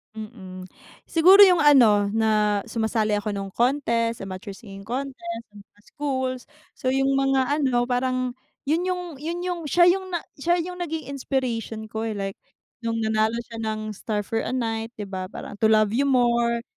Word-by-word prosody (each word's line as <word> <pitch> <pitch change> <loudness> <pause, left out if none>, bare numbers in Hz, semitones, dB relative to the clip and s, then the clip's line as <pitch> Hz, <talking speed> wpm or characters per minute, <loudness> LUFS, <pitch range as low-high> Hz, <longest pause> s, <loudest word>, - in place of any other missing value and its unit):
Mm, 190 -4 -9 0.4
siguro 360 +4 +6
yung 360 -4 +4
ano, 225 -9 +5
na 210 -1 +2
sumasali 220 -1 0
ako 205 +1 -1
nung 195 -1 -5
contest, 235 -4 0
amateur 195 +1 -7
singing 195 -3 -11
contest 230 0 -5
do'n 205 - -12
sa 205 - -27
schools. 260 -3 -3 0.3
So 255 - -2
yung 270 +1 +2
mga 270 -1 +2 0.2
ano 245 -3 +2
parang 255 0 -1 0.3
yun 315 +4 +1
yung 360 -1 -1 0.2
yun 335 +3 -3
yung, 355 -1 -2
siya 345 +4 +5
yung 375 +1 +2
na 350 - -1 0.2
siya 345 +5 +1
yung 360 0 -7
naging 320 -3 -4
inspiration 235 -5 -3
ko, 220 +1 -5
eh, 215 - -4
like 195 -1 -4 0.4
nung 230 -1 -2
nanalo 220 0 +1
siya 230 -1 -7
ng 215 -1 -3
Star 210 0 -3
for 225 +3 -1
a - - -4
Night 225 -3 -2
di 210 - -5
ba, 185 -1 -5
parang - - -8
To 220 - +5
Love 215 -1 +3
You 275 +4 +2
More, 235 -2 +2
230 Hz, 175 wpm, -24 LUFS, 215-270 Hz, 0.4 s, siguro